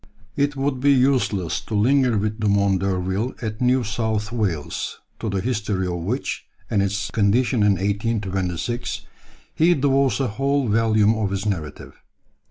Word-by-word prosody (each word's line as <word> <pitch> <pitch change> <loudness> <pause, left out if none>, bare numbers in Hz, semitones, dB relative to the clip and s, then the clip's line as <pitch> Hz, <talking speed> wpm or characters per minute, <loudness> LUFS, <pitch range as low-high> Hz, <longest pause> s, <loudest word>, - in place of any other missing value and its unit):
] 105 +1 -31
It 145 0 -6
would 135 -1 -1
be 140 +2 +4
useless 125 -9 +2
to 110 - -5
linger 125 +2 +3
with 105 +2 -2
Dumont 100 -2 +2
d'Urville 95 +5 -1
at 110 -2 -5
New 125 0 +3
South 110 -1 -2
Wales, 95 -11 -2 0.2
to 110 - -3
the 95 -1 -1
history 105 -5 -1
of 90 -1 -2
which, 110 +11 -3 0.2
and 100 - +2
its 100 -2 -1
condition 115 +4 +2
in 105 -1 +5
1826, 100 +2 -2 0.5
he 170 +2 +4
devotes 135 -1 +2
a 135 - +1
whole 135 +4 0
volume 110 0 +3
of 110 -3 -1
his 100 +1 -3
narrative. 80 -8 -4
110 Hz, 155 wpm, -22 LUFS, 100-125 Hz, 0.5 s, in